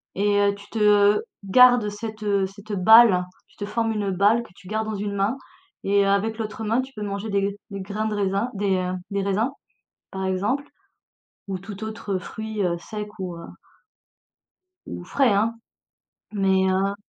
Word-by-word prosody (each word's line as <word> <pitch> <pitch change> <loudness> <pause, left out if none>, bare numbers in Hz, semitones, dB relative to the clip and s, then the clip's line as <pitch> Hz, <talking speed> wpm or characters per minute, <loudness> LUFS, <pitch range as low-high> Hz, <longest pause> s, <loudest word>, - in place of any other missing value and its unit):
et 205 +1 +2
heu, 200 0 +2
tu 200 0 -14
te 210 -1 +4 0.2
garde 245 +1 +6
cette, 215 +1 -7
heu, 200 -2 +1
cette 205 +2 -10
balle, 205 -1 +7 0.2
tu - - -27
te 205 - -4
formes 225 +2 -1
une 205 -2 -1
balle 205 +6 +3
que - - -15
tu 190 - -16
gardes 220 +2 -2
dans 215 - -3
une 200 0 -3
main 200 +5 +1 0.5
et 200 0 +3
avec 200 +3 +1
l'autre 220 0 -5
main, 225 +4 +1
tu 265 - -9
peux 210 - -7
manger 200 +2 -4
des 200 -1 +1
g 200 0 -1
des 200 -1 -6
grains 210 +3 -3
de 215 - -2
raisin, 200 +4 0
des, 200 -1 0
heu, 180 0 -2 0.2
des 200 0 0
raisins, 205 +6 0 0.6
par 190 0 -4
exemple 205 +10 -1 0.8
ou 190 -1 -3
tout 200 +2 -9
autre 210 -3 -3
fruit, 220 +2 -5
heu, 175 -2 0
sec 210 +4 -6
ou, 180 -2 -5
heu 170 - -9 1.4
ou - - -7
frais, 255 +5 +2
hein, 225 +3 0 0.7
mais, 190 -2 +2
heu 195 +1 +1
205 Hz, 185 wpm, -24 LUFS, 195-220 Hz, 1.4 s, balle